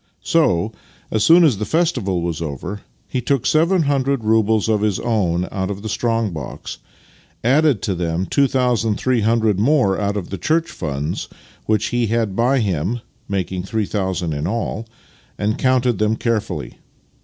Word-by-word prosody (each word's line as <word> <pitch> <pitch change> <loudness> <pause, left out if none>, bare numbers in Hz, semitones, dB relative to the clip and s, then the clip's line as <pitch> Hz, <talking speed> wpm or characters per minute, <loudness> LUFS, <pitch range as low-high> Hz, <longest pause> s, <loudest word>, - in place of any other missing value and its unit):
So, 110 - +2 0.4
as 110 -1 +1
soon 170 +2 +7
as 150 -6 +5
ever - - -10
the 105 - -1
festival 125 - +1
was 85 -2 -3
over, 85 +7 -5 0.3
he 130 - -2
took 135 0 0
seven 165 +3 +3
hundred 140 -3 0
roubles 110 -1 +2
of 110 -2 +1
his 105 -3 +1
own 90 -6 0
out 95 0 -2
of 100 0 -5
the 110 - -4
strong 115 -1 0
box, 75 -6 -7 0.6
added 135 -2 +3
to 100 - 0
them 85 0 -1
two 140 +5 +2
thousand 125 -5 +1
three 125 +1 +1
hundred 110 -2 +2
more 115 -5 +2
out 100 0 -1
of 95 -3 -5
the 100 - -4
church 165 - +1
funds 75 0 -3 0.4
which 110 -1 +1
he 120 -1 0
had 110 -3 0
by 125 +5 +2
him 100 +4 -1 0.3
(making 95 -2 -2
three 105 +3 -2
thousand 95 -5 -2
in 75 +2 -2
all), 115 +1 -3 0.5
and 105 +2 -1
counted 125 -4 +2
them 110 +1 +2
carefully. 115 -2 -2
110 Hz, 170 wpm, -20 LUFS, 95-125 Hz, 0.6 s, soon